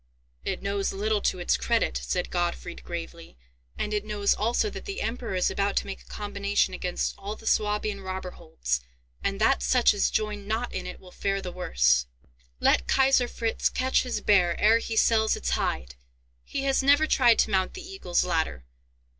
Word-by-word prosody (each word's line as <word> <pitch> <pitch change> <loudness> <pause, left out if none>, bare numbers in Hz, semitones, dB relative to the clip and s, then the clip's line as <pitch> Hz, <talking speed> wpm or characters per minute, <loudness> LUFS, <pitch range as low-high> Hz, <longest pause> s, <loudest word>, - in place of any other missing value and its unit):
"It - - -3
knows 200 0 -1
little 210 +1 0
to - - 0
its 175 - +1
credit," - - 0
said 60 0 -2
Gottfried, 60 +1 -3
gravely; - - -7 0.4
"and 210 - -2
it 210 -1 0
knows 210 -1 +1
also 235 - +1
that - - -8
the 395 -1 -5
Emperor 230 -2 -3
is 180 - +1
about 200 0 0
to - - +1
make 195 - -7
a - - -19
combination 205 -1 -1
against 180 -1 -2
all 200 +2 -5
the 225 - -15
Swabian 210 -1 0
robber 185 -1 -5
holds, 65 - -3 0.4
and - - -1
that - - +3
such - - +4
as 60 - +1
join 210 -2 -2
not 225 +3 -2
in - - -4
it - - -8
will 185 - -15
fare 195 +1 -1
the 185 -2 -6
worse." 60 - +2 0.5
"Let 60 - +3
Kaiser 265 -2 +4
Fritz 230 -2 -1
catch 260 +1 +1
his 250 - -3
bear 180 -4 +3
ere 220 +2 +5
he 225 -1 -4
sells 220 0 +3
its - - -3
hide! 60 0 -1 0.5
He 275 - -4
has 270 0 +2
never 285 +3 +5
tried 245 -6 +4
to 220 - +2
mount 190 -1 +1
the 370 -2 -8
Eagle's 380 - -1
Ladder! 160 - -1
200 Hz, 190 wpm, -27 LUFS, 175-225 Hz, 0.5 s, ere